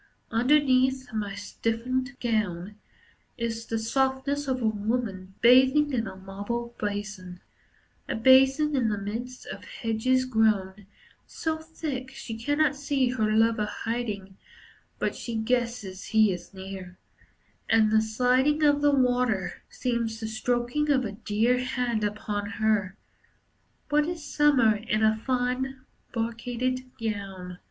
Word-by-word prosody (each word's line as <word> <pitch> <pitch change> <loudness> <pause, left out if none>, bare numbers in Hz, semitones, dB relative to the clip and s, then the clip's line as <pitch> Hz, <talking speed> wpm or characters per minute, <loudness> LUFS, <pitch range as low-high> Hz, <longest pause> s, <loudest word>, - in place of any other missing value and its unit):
Underneath 260 0 +3
my 205 -2 -3
stiffened 250 +5 -2
gown 210 -5 -1 0.6
Is 230 -1 -3
the 225 - -1
softness 265 +4 0
of 260 -1 0
a 235 - -2
woman 205 -3 -2
bathing 265 +4 +6
in 230 -4 0
a 190 - -7
marble 205 +5 -5
basin, 205 -3 -4 0.7
A - - -1
basin 265 +5 +5
in 245 -4 +2
the 210 - -1
midst 230 +6 -5
of - - -8
hedges 255 +3 0
grown 210 -5 +1 0.4
So 320 -1 -3
thick, 310 -5 -5
she 260 -4 -7
cannot 290 +5 +1
see 275 -2 0
her 220 -4 0
lover 225 -1 +3
hiding, 210 -5 -4 0.6
But - - -1
she 235 - -5
guesses 225 -4 -1
he 220 -3 +4
is 175 -1 -8
near, 190 -1 -8 0.7
And 220 -1 +4
the 220 0 +5
sliding 255 +7 +2
of 290 -1 +4
the 290 -1 +4
water 245 -7 +1
Seems 235 -3 -2
the 225 - -4
stroking 245 +6 -1
of 265 -3 +3
a 205 - -3
dear 225 +4 +1
Hand 250 -3 -1
upon 205 0 -2
her. 210 -3 +1 0.9
What 300 +1 +3
is 335 -3 -5
Summer 275 -8 +4
in 215 0 -1
a 220 0 +4
fine 255 +3 -1 0.3
brocaded 245 +2 -2
gown! 195 -5 -5
230 Hz, 130 wpm, -27 LUFS, 210-260 Hz, 0.9 s, bathing